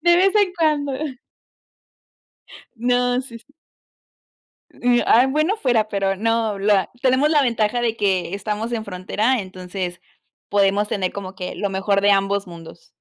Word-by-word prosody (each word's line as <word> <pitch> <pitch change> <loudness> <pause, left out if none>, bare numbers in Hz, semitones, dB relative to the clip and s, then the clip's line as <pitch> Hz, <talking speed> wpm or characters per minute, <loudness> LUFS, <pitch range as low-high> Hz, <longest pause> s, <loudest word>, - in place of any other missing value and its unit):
de 345 0 +5
vez 390 +3 +3
en 400 -3 +3
cuando. 295 -3 +1 1.8
No, 245 +1 +1
sí, 235 -3 -10
sí. 290 +5 -28 1.8
Bueno 310 +9 +1
fuera, 235 - +1
pero 195 -2 0
no, 225 0 0
la 200 -1 +2
tenemos 265 +4 +3
la 300 - +4
ventaja 235 -1 0
de 230 -1 -1
que 190 -3 0
estamos 210 +3 -3
en 220 -2 -2
frontera, 205 +6 -1
entonces 185 -1 -6 0.5
podemos 200 +1 +2
tener 185 -3 -1
como 190 -1 -7
que 180 -1 -6
lo 200 -2 -3
mejor 195 +1 0
de 205 - +4
ambos 200 0 +1
mundos. 170 - -12
210 Hz, 140 wpm, -21 LUFS, 195-250 Hz, 1.8 s, de